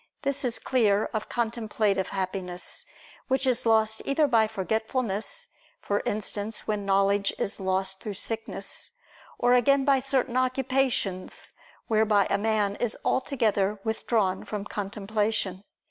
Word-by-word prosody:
This 280 Hz, 0 st, +1 dB
is 245 Hz, -3 st, +1 dB
clear 215 Hz, -5 st, +2 dB
of 215 Hz, -1 st, -3 dB
contemplative 220 Hz, -4 st, 0 dB
happiness, 185 Hz, -2 st, -3 dB, 0.4 s
which 265 Hz, 0 st, +1 dB
is 250 Hz, -2 st, +1 dB
lost 220 Hz, -1 st, +3 dB
either 285 Hz, +2 st, +2 dB
by 230 Hz, -5 st, +4 dB
forgetfulness, 220 Hz, -, -2 dB, 0.3 s
for 205 Hz, 0 st, -1 dB
instance, 210 Hz, +1 st, -1 dB
when 210 Hz, -2 st, -2 dB
knowledge 195 Hz, +1 st, +3 dB
is 205 Hz, -, -2 dB
lost 190 Hz, 0 st, 0 dB
through 210 Hz, -1 st, -5 dB
sickness; 225 Hz, +3 st, -3 dB, 0.4 s
or 245 Hz, -, +3 dB
again 270 Hz, +2 st, +4 dB
by 275 Hz, -1 st, +4 dB
certain 260 Hz, -2 st, 0 dB
occupations, 255 Hz, -6 st, 0 dB, 0.3 s
whereby 215 Hz, -2 st, +3 dB
a -, -, +2 dB
man 210 Hz, -2 st, +1 dB
is 240 Hz, -2 st, -1 dB
altogether 210 Hz, -7 st, +1 dB
withdrawn 220 Hz, -4 st, 0 dB
from 205 Hz, -2 st, -5 dB
contemplation. 205 Hz, -1 st, -2 dB
220 Hz, 125 wpm, -27 LUFS, 200-245 Hz, 0.4 s, by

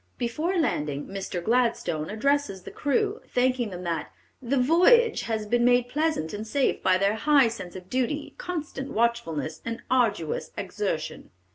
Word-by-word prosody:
Before 310 Hz, +10 st, -1 dB
landing, 150 Hz, -, -1 dB
Mr. 190 Hz, -3 st, -5 dB
Gladstone 230 Hz, -9 st, +1 dB
addresses 220 Hz, -3 st, 0 dB
the -, -, -9 dB
crew, 410 Hz, -, 0 dB
thanking 250 Hz, -2 st, +1 dB
them 180 Hz, -1 st, -7 dB
that 165 Hz, -3 st, -3 dB, 0.3 s
"the 260 Hz, +2 st, 0 dB
voyage 365 Hz, -, +5 dB
has 220 Hz, -1 st, -1 dB
been 240 Hz, +3 st, +1 dB
made 245 Hz, 0 st, +4 dB
pleasant 300 Hz, -, -1 dB
and 210 Hz, +2 st, -5 dB
safe 270 Hz, +4 st, +1 dB
by 185 Hz, -1 st, +4 dB
their 195 Hz, +2 st, +2 dB
high 275 Hz, +2 st, +4 dB
sense 190 Hz, -6 st, -8 dB
of 185 Hz, -1 st, -9 dB
duty, 260 Hz, +6 st, -2 dB
constant 310 Hz, -, -4 dB
watchfulness, 210 Hz, -10 st, -1 dB
and 230 Hz, 0 st, -5 dB
arduous 215 Hz, -11 st, 0 dB
exertion." -, -, -3 dB
235 Hz, 150 wpm, -26 LUFS, 195-285 Hz, 0.3 s, voyage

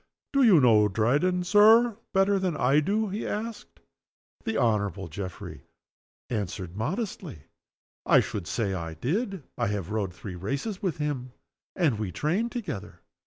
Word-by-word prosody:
"Do 275 Hz, -, +3 dB
you 215 Hz, -, +7 dB
know 110 Hz, -5 st, +5 dB
Dryden, 145 Hz, -, +1 dB
Sir, 220 Hz, +4 st, +6 dB, 0.2 s
better 195 Hz, +1 st, +3 dB
than 185 Hz, -4 st, -1 dB
I 135 Hz, +4 st, +4 dB
do?" 205 Hz, +7 st, 0 dB
he 205 Hz, +3 st, -4 dB
asked. 225 Hz, +1 st, -5 dB, 0.7 s
The 225 Hz, -1 st, -1 dB
Honorable 105 Hz, -7 st, 0 dB
Geoffrey 90 Hz, +2 st, -8 dB, 0.6 s
answered, 95 Hz, -5 st, -4 dB
modestly, 160 Hz, -, -4 dB, 0.6 s
"I -, -, +7 dB
should 95 Hz, -5 st, -3 dB
say 100 Hz, -1 st, -1 dB
I 85 Hz, -3 st, -5 dB
did. 190 Hz, -, -2 dB, 0.2 s
I -, -, +1 dB
have 100 Hz, -2 st, -3 dB
rowed 100 Hz, -5 st, -2 dB
three 100 Hz, 0 st, -8 dB
races 140 Hz, -, -4 dB
with 185 Hz, -6 st, -1 dB
him, 140 Hz, -5 st, -3 dB, 0.4 s
and 150 Hz, -, +1 dB
we 105 Hz, -4 st, -3 dB
trained 190 Hz, -, -1 dB
together." 150 Hz, -, -6 dB
145 Hz, 145 wpm, -27 LUFS, -, 0.7 s, you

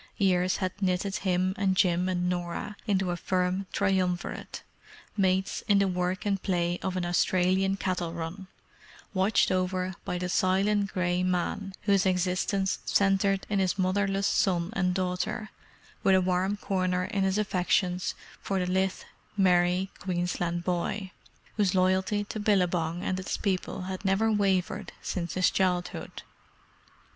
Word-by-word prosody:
Years 185 Hz, -2 st, +2 dB
had 185 Hz, +1 st, -3 dB
knitted 190 Hz, +1 st, 0 dB
him 185 Hz, -1 st, 0 dB
and 190 Hz, -2 st, +1 dB
Jim 180 Hz, -1 st, +3 dB
and 180 Hz, -1 st, 0 dB
Norah 180 Hz, +3 st, -3 dB
into 190 Hz, -3 st, +1 dB
a -, -, -1 dB
firm 185 Hz, +2 st, -1 dB
triumvirate, 185 Hz, -3 st, -1 dB, 0.5 s
mates 190 Hz, -1 st, +1 dB
in 205 Hz, -, +5 dB
the 200 Hz, 0 st, +3 dB
work 180 Hz, +1 st, -1 dB
and 195 Hz, -2 st, 0 dB
play 175 Hz, -1 st, 0 dB
of 185 Hz, -1 st, -2 dB
an 180 Hz, -, -1 dB
Australian 185 Hz, +2 st, +2 dB
cattle 180 Hz, -3 st, -2 dB
run; 170 Hz, +3 st, -6 dB, 0.7 s
watched 195 Hz, +2 st, +3 dB
over 185 Hz, 0 st, 0 dB
by 180 Hz, -, -3 dB
the 180 Hz, 0 st, -2 dB
silent 195 Hz, +3 st, +2 dB
grey 180 Hz, -1 st, 0 dB
man 185 Hz, +2 st, -1 dB
whose 200 Hz, -1 st, +3 dB
existence 185 Hz, +1 st, 0 dB
centred 195 Hz, 0 st, +2 dB
in 205 Hz, -2 st, 0 dB
his 190 Hz, 0 st, +1 dB
motherless 195 Hz, +1 st, +1 dB
son 180 Hz, -2 st, +1 dB
and 180 Hz, -3 st, 0 dB
daughter—with 195 Hz, +1 st, -2 dB
a -, -, +5 dB
warm 185 Hz, +2 st, 0 dB
corner 185 Hz, -2 st, 0 dB
in 200 Hz, -2 st, -2 dB
his 190 Hz, +1 st, +1 dB
affections 185 Hz, -2 st, 0 dB, 0.3 s
for 195 Hz, -, -2 dB
the 180 Hz, -, 0 dB
lithe, 190 Hz, +1 st, 0 dB, 0.4 s
merry 180 Hz, 0 st, +3 dB
Queensland 175 Hz, -1 st, -2 dB
boy, 185 Hz, +2 st, -2 dB, 0.5 s
whose 195 Hz, -3 st, +2 dB
loyalty 190 Hz, +2 st, +2 dB
to 210 Hz, +1 st, -6 dB
Billabong 180 Hz, -5 st, +1 dB
and 185 Hz, 0 st, -1 dB
its 190 Hz, -, -3 dB
people 185 Hz, -2 st, -2 dB
had 185 Hz, +1 st, -5 dB
never 200 Hz, +3 st, +2 dB
wavered 195 Hz, -1 st, 0 dB
since 170 Hz, -3 st, -3 dB
his 185 Hz, 0 st, +3 dB
childhood. 180 Hz, -2 st, -1 dB
185 Hz, 140 wpm, -28 LUFS, 180-195 Hz, 0.7 s, in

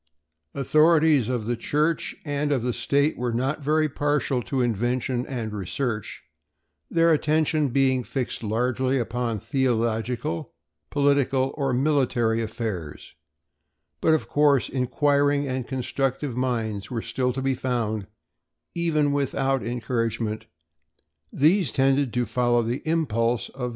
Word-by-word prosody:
Authorities 155 Hz, -2 st, +4 dB
of 120 Hz, -4 st, -2 dB
the 120 Hz, +2 st, 0 dB
Church 150 Hz, +7 st, 0 dB
and 145 Hz, 0 st, -1 dB
of 130 Hz, -5 st, +1 dB
the 125 Hz, 0 st, 0 dB
state 140 Hz, +3 st, +1 dB
were 125 Hz, -1 st, -1 dB
not 130 Hz, +6 st, -1 dB
very 155 Hz, +2 st, +2 dB
partial 145 Hz, -2 st, 0 dB
to 135 Hz, +3 st, -3 dB
invention 120 Hz, +2 st, 0 dB
and 115 Hz, -5 st, -4 dB
research, 105 Hz, +3 st, -3 dB, 0.7 s
their 165 Hz, 0 st, +3 dB
attention 155 Hz, -1 st, +1 dB
being 130 Hz, 0 st, +2 dB
fixed 125 Hz, 0 st, -3 dB
largely 125 Hz, +4 st, 0 dB
upon 120 Hz, -1 st, -2 dB
theological, 115 Hz, -5 st, -1 dB, 0.4 s
political, 140 Hz, -2 st, +2 dB
or 140 Hz, -3 st, -1 dB
military 125 Hz, -4 st, +1 dB
affairs; 110 Hz, -9 st, -5 dB, 0.9 s
but, 160 Hz, -, +4 dB
of 155 Hz, -, -3 dB
course, 145 Hz, -3 st, +3 dB
inquiring 145 Hz, +2 st, +1 dB
and 130 Hz, -2 st, -3 dB
constructive 135 Hz, 0 st, -2 dB
minds 115 Hz, -5 st, -2 dB
were 115 Hz, -3 st, -3 dB
still 125 Hz, -1 st, -1 dB
to 135 Hz, -, -3 dB
be 135 Hz, 0 st, +1 dB
found; 115 Hz, -5 st, -2 dB, 0.7 s
even 155 Hz, -4 st, +1 dB
without 135 Hz, -1 st, 0 dB
encouragement 115 Hz, -2 st, -2 dB, 0.8 s
these 160 Hz, -, +3 dB
tended 135 Hz, -1 st, +2 dB
to 125 Hz, 0 st, 0 dB
follow 120 Hz, +1 st, +1 dB
the 120 Hz, +3 st, -2 dB
impulse 120 Hz, -8 st, 0 dB
of -, -, -18 dB
their 125 Hz, -, -1 dB
natures. -, -, -3 dB
130 Hz, 130 wpm, -25 LUFS, 115-145 Hz, 0.9 s, Authorities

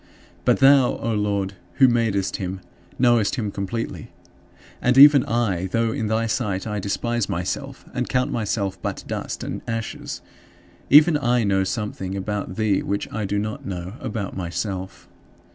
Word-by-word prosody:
But -, -, +4 dB
thou, 135 Hz, -2 st, +6 dB
O 115 Hz, -, -2 dB
Lord, 100 Hz, -2 st, -1 dB, 0.2 s
who 130 Hz, -, +5 dB
madest 110 Hz, -5 st, +1 dB
him, 95 Hz, -1 st, -4 dB, 0.4 s
knowest 120 Hz, -4 st, +3 dB
him 105 Hz, -4 st, -2 dB
completely. 105 Hz, +4 st, -4 dB, 0.7 s
And 125 Hz, +1 st, +2 dB
even 140 Hz, -1 st, +9 dB
I 100 Hz, -6 st, 0 dB
though 115 Hz, +3 st, 0 dB
in 110 Hz, -, -2 dB
thy 110 Hz, +1 st, +1 dB
sight 105 Hz, -5 st, -1 dB
I 105 Hz, -2 st, -3 dB
despise 120 Hz, +3 st, -1 dB
myself 130 Hz, +11 st, -4 dB
and 125 Hz, -1 st, -2 dB
count 125 Hz, -1 st, +1 dB
myself 100 Hz, -3 st, -2 dB
but -, -, -4 dB
dust -, -, -4 dB
and -, -, -5 dB
ashes 115 Hz, -1 st, -5 dB, 0.7 s
even 150 Hz, +2 st, +7 dB
I 120 Hz, -3 st, +2 dB
know 95 Hz, -2 st, +2 dB
something 95 Hz, -2 st, -3 dB
about 100 Hz, -1 st, -3 dB
thee 105 Hz, -2 st, +1 dB
which 100 Hz, 0 st, -3 dB
I 110 Hz, -1 st, -2 dB
do 100 Hz, +1 st, -1 dB
not 105 Hz, +1 st, -3 dB
know 90 Hz, 0 st, -5 dB
about 105 Hz, -3 st, -4 dB
myself. 95 Hz, +1 st, -4 dB
105 Hz, 155 wpm, -23 LUFS, 95-120 Hz, 0.7 s, even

